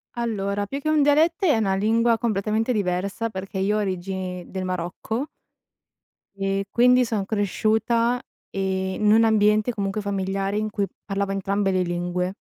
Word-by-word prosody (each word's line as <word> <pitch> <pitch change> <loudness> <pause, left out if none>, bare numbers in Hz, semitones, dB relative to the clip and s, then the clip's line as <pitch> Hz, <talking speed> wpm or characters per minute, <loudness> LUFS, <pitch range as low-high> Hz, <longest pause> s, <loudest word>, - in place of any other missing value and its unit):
Allora, 205 -4 -1
più 275 +7 -5
che 310 - -2
un 305 -2 +4
dialetto, 320 +5 +3
è 300 -9 +4
una 195 -3 +1
lingua 225 +3 +2
completamente 220 +2 0
diversa, 200 +3 -1
perché 190 -1 -5
io 205 +2 +1
ho - - +1
origini 185 -1 -3
del 190 -1 -4
Marocco 185 - -3 1.1
e 195 0 -1
quindi 250 +1 +5
son 215 -4 -2
cresciuta, 220 +4 +1 0.3
ehm, 190 0 -2
in 210 - +6
un 225 +1 +5
ambiente, 215 +1 +3
comunque 200 0 -2
familiare, 195 0 -2
in 215 0 -1
cui 205 -1 -1 0.2
parlava 195 -1 -2
entrambe 195 0 0
le 185 -1 +1
lingue. 175 +1 -2
205 Hz, 155 wpm, -24 LUFS, 195-225 Hz, 1.1 s, in